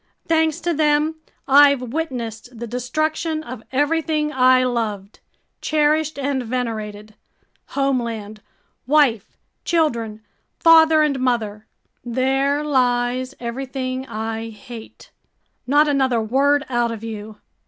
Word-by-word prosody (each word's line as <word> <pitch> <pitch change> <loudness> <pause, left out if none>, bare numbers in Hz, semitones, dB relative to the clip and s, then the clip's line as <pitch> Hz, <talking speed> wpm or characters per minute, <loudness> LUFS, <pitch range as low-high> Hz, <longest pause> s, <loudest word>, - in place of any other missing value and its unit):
Thanks 320 -1 +2
to 345 0 0
them, 305 +1 +1 0.3
I've 280 0 +6
witnessed 245 -6 -5
the 235 - -5
destruction 310 +7 -2
of 250 -5 -8
everything 300 +2 0
I 255 0 +5
loved, 220 -5 -3 0.4
cherished, 310 0 +1
and 275 -1 -1
venerated—homeland, 225 0 -4 0.5
wife, 265 -8 +2 0.3
children, 235 -10 -1 0.3
father, 320 -1 +6
and 280 -3 0
mother! 220 -4 -1 0.4
There 270 +4 0
lies 255 -1 0
everything 255 +1 -4
I 225 0 -4
hate! 225 +1 -12 0.6
Not 295 +3 +4
another 265 -4 +2
word 280 +6 +2
out 240 -2 0
of 225 -1 -7
you!" 215 -1 -7
255 Hz, 100 wpm, -21 LUFS, 230-295 Hz, 0.6 s, I've